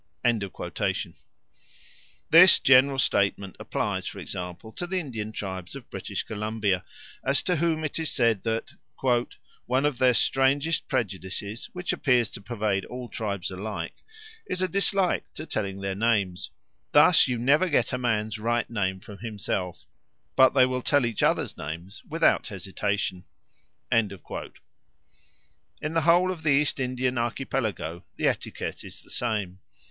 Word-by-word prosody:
This 170 +2 +9
general 135 +1 +6
statement 100 -5 +1
applies, - - -2
for - - -6
example, 90 +5 -6
to 175 - -5
the 185 +1 0
Indian 115 -9 -5
tribes 95 -1 -6
of 135 -4 -11
British - - -4
Columbia, 105 -3 -1 0.4
as 140 +1 +2
to 180 -2 +1
whom 160 0 +1
it 155 +1 -2
is 160 - -1
said 115 -6 +2
that 115 0 -2 1.0
"one 130 +3 +2
of 145 -4 0
their 125 -2 +5
strangest 140 +7 +2
prejudices, 105 -2 -3
which 180 0 -2
appears 125 -4 +2
to - - -7
pervade 105 -3 -1
all 125 -1 -7
tribes 100 -3 -3
alike, 100 +3 -4 0.5
is 185 - -1
a - - +2
dislike 195 -1 +1
to 155 - -6
telling 100 -8 -3
their 100 0 -2
names 100 -4 0 0.4
thus - - +7
you 125 -1 -1
never 145 +9 +3
get 135 -6 +1
a 125 - 0
man's 110 -3 0
right 120 +2 0
name 95 -4 -1
from 100 +1 -11
himself; 100 -7 -4 0.5
but 130 0 +6
they 130 -2 +7
will 130 0 -1
tell 145 0 +3
each 115 -2 -2
other's - - +1
names 85 +7 -7
without 165 +1 +3
hesitation." 95 -1 -2 0.7
In 115 -2 +4
the 100 - -8
whole 175 +2 +5
of 175 -3 -6
the 155 - 0
East 145 0 +3
Indian 130 -1 0
Archipelago 115 -8 -2
the - - +1
etiquette - - -3
is - - -9
the - - -15
same. 105 -6 -2
115 Hz, 140 wpm, -26 LUFS, 100-135 Hz, 1.0 s, This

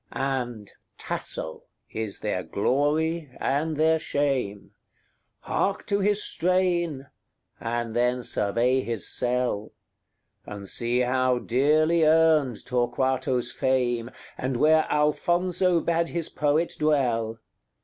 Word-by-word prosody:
XXXVI. - - -6
And 125 -6 -3 0.3
Tasso 80 - -4 0.3
is 110 -2 -4
their 105 -4 -1
glory 150 - 0
and 150 +3 -1
their 160 +1 +3
shame. 135 - -2 0.7
Hark 195 0 -1
to 200 0 0
his 205 +1 +1
strain! 175 -5 0 0.5
and 115 0 -3
then 125 +1 +1
survey 120 +6 +1
his 115 -4 -3
cell! 125 -4 -1 0.7
And 100 -1 -8
see 120 +4 0
how 130 0 +2
dearly 155 +7 +2
earned 155 -6 +3
Torquato's 125 0 0
fame, 120 -3 0 0.3
And 130 -1 -1
where 155 +3 +4
Alfonso 175 +4 +2
bade 170 0 0
his 170 -2 -3
poet 150 +3 0
dwell. 120 -7 +1
130 Hz, 110 wpm, -26 LUFS, 120-160 Hz, 0.7 s, where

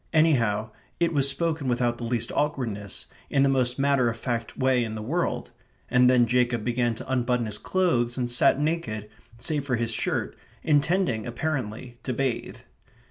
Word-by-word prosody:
anyhow, 115 -10 +2 0.3
it 170 -1 +2
was 140 -2 +4
spoken 155 0 -1
without 120 -1 0
the - - -5
least 115 -1 -1
awkwardness; 115 -9 -2 0.2
in 140 - +3
the - - +4
most 125 -2 +1
matter 135 -3 +3
of 115 - -4
fact 115 -2 -3
way 130 -2 +2
in 110 -1 -4
the - - -4
world; 125 -3 -2 0.4
and 125 0 +5
then 125 -1 +5
Jacob 120 -1 +1
began 120 -1 0
to - - -9
unbutton 125 -2 +1
his 105 -1 -6
clothes 125 -11 +1
and 120 -1 -1
sat 125 +2 +4
naked, 145 -10 -2 0.3
save 145 +4 -1
for 135 -3 0
his 115 0 -1
shirt, - - -2 0.3
intending, 150 - +1
apparently, 120 -3 -4
to 130 - -3
bathe. 130 -1 -2
125 Hz, 170 wpm, -26 LUFS, 115-140 Hz, 0.4 s, and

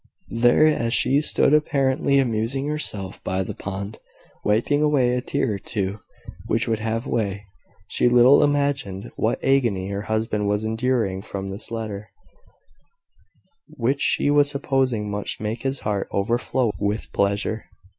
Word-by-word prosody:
There, 120 +5 +4
as 120 -6 +2
she 135 +3 +3
stood 150 -1 +3
apparently 140 -1 +2
amusing 125 +1 0
herself 105 -11 -2
by 95 +1 -1
the - - -5
pond, 100 +2 -6 0.4
wiping 115 +8 +2
away 140 -5 +3
a 125 - 0
tear 130 -3 -1
or 100 - -4
two 100 +1 -3 0.5
which - - 0
would 110 -1 0
have 115 +2 -2
way, 100 -5 -2 0.4
she 125 - +2
little 125 +4 +6
imagined 140 -9 -1
what 110 - 0
agony 115 -9 +1
her 100 0 -3
husband 110 -1 0
was 105 +1 0
enduring 110 -4 0
from 95 -1 -6
this 100 +3 -7
letter, 105 -3 -5 1.6
which 135 +5 -1
she 145 - +2
was 145 -1 +4
supposing 130 -6 0
must 105 0 -4
make 110 +2 -3
his 135 0 -2
heart 100 -2 -2
overflow 120 +3 0
with 105 +2 -2
pleasure. 100 +2 0
115 Hz, 145 wpm, -23 LUFS, 105-135 Hz, 1.6 s, little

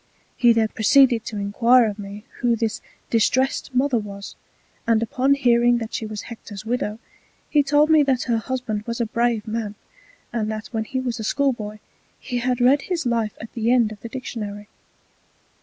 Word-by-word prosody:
He 240 -1 +5
then 225 -1 +2
proceeded 235 +1 +4
to 215 - -5
enquire 230 +5 +4
of 210 -1 -3
me 205 +1 -8 0.2
who 240 -1 +2
this 225 +1 -2 0.3
Distrest 260 +5 +1
Mother 255 -1 +2
was; 200 -1 -8 0.5
and 230 -1 +3
upon 260 +4 +2
hearing 240 -2 +3
that 225 -1 -5
she 220 - -3
was 215 -1 -6
Hector's 220 -3 -9
Widow, 225 -2 -2 0.5
he 295 - +5
told 290 +2 +3
me 310 -1 +7
that 265 -3 +1
her 235 -2 0
Husband 240 -3 -3
was 235 +1 -3
a 235 - +1
brave 235 0 0
Man, 215 -1 -3 0.6
and 220 -2 -1
that 215 0 -5
when 220 -2 -2
he 260 - -3
was 245 -2 -3
a - - -4
Schoolboy 220 -4 -1 0.4
he 245 -2 -3
had 250 +1 0
read 260 +4 +4
his 340 -3 -3
Life 230 -3 -1
at 225 - -9
the 230 0 -1
end 240 -3 +3
of 210 - -9
the 230 - -7
Dictionary. 210 -5 -6
235 Hz, 185 wpm, -22 LUFS, 215-255 Hz, 0.6 s, me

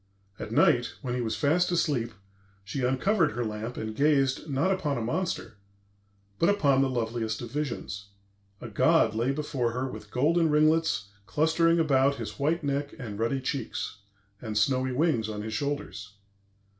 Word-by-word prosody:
At - - -6
night, - - +3
when 125 -2 -2
he 125 - -1
was 110 -2 -1
fast 175 +5 +2
asleep, 140 -9 0 0.5
she 105 +7 -4
uncovered 150 - +2
her 120 +1 -2
lamp 110 +3 -5
and 110 0 -4
gazed, 140 +1 +2
not 145 +7 +1
upon 160 -8 0
a - - -2
monster, 145 - -3 0.8
but 170 - +4
upon 140 -10 +3
the 135 - +2
loveliest 115 -3 -2
of 115 - -7
visions. 120 -8 -4 0.5
A 120 - -6
god 115 +2 +3
lay 120 +4 +1
before 135 -5 -1
her 130 +2 -2
with 130 - -9
golden 160 +6 +2
ringlets 155 -7 +2 0.2
clustering 160 - +3
about 140 -3 +3
his 105 -4 -7
white 155 +4 +1
neck 140 0 -2
and 110 -6 -7
ruddy 115 +4 0
cheeks, 115 -5 -4 0.4
and 110 -3 -4
snowy 130 +3 +2
wings 125 -5 +1
on 105 -1 -4
his 110 0 -5
shoulders. 110 -6 -4
135 Hz, 160 wpm, -28 LUFS, 115-150 Hz, 0.8 s, but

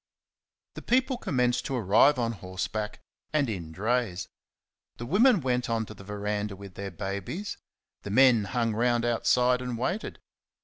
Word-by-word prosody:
The - - -8
people 260 +2 +2
commenced 125 - 0
to 135 - -2
arrive 115 +6 +4
on 115 -2 0
horseback 105 +1 -4 0.3
and 150 -3 +2
in 90 -8 -5
drays. 105 0 -1 0.7
The 120 - -6
women 205 - +4
went 125 -2 0
on 115 -1 0
to 110 - -10
the 95 - -13
verandah 105 0 -3
with 100 -1 -11
their 100 +1 -5
babies; 100 - -5 0.4
the - - -7
men 120 -1 +5
hung 115 -1 0
round 120 +1 +1
outside 125 +1 +2
and 125 -2 -4
waited. 175 - -2
115 Hz, 150 wpm, -28 LUFS, 100-125 Hz, 0.7 s, men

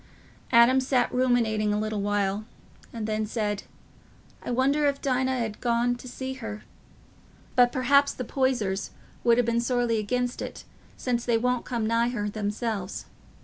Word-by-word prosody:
Adam 240 +2 +6
sat 255 -1 +1
ruminating 230 -4 +2
a 210 - +1
little 215 -1 -2
while, 205 0 0 0.5
and 225 -2 -4
then 215 0 -1
said, 210 -2 -2 0.8
"I - - -7
wonder 275 +4 +2
if 280 -1 0
Dinah 260 -2 0
'ud 210 -1 -6
ha' - - -27
gone 240 0 +1
to 250 - -11
see 260 +1 -5
her. 215 -1 -6 0.9
But 245 -2 +5
perhaps 280 +2 +3
the 250 - -5
Poysers 230 -8 0 0.3
would 235 -1 +5
ha' 245 - +3
been 235 0 +1
sorely 240 -2 +1
against 245 +4 -1
it, - - -6 0.3
since 240 -2 -1
they 235 -2 +2
won't 250 +1 0
come 235 -3 -2
nigh 230 +2 +2
her 235 -4 -2
themselves. 205 -1 -3
235 Hz, 160 wpm, -26 LUFS, 215-250 Hz, 0.9 s, Adam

